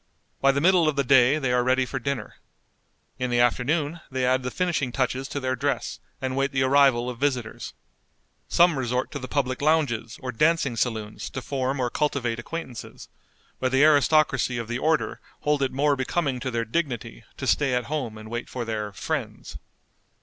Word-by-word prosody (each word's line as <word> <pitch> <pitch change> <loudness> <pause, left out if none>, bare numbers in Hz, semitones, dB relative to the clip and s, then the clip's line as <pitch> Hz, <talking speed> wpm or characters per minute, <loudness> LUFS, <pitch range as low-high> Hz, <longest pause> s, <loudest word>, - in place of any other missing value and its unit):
By 135 - +5
the 140 +1 -1
middle 175 -1 +4
of 150 - -2
the 140 - +1
day 130 +2 +5
they 130 -5 0
are 125 0 +3
ready 130 +1 +2
for 135 +1 -4
dinner. 140 +1 -4 0.8
In 125 0 -1
the 120 0 +1
afternoon 145 +7 +1
they 130 -1 -1
add 130 +1 +2
the 125 - -3
finishing 160 -4 -1
touches 130 +1 -1
to 140 - -4
their 130 -1 -1
dress, 140 0 -2 0.2
and 130 0 -3
wait 135 +1 0
the 130 -1 +1
arrival 130 -3 +4
of 125 -2 -5
visitors. 130 -5 -2 0.7
Some 170 -5 +4
resort 125 0 -1
to 145 - -4
the 130 - -6
public 130 -2 -1
lounges 145 -7 +1
or 125 - -3
dancing 150 0 +2
saloons 110 -3 -2
to - - -5
form 130 0 -2
or 120 -1 0
cultivate 125 -6 -1
acquaintances, 130 -2 -7 0.5
but 130 -1 0
the 135 +2 +4
aristocracy 155 -4 +4
of 115 -2 -4
the 120 +2 -3
order 160 +2 0 0.2
hold 150 -1 +1
it 135 - +1
more 145 +2 +2
becoming 135 0 -1
to 130 - -3
their 115 -2 -1
dignity 120 - -3
to - - -4
stay 135 -4 +2
at 125 - 0
home 125 -5 -4
and 110 +1 -10
wait 120 0 -4
for 125 -2 -4
their 105 -2 -3
"friends." 100 - -5
130 Hz, 190 wpm, -25 LUFS, 120-145 Hz, 0.8 s, By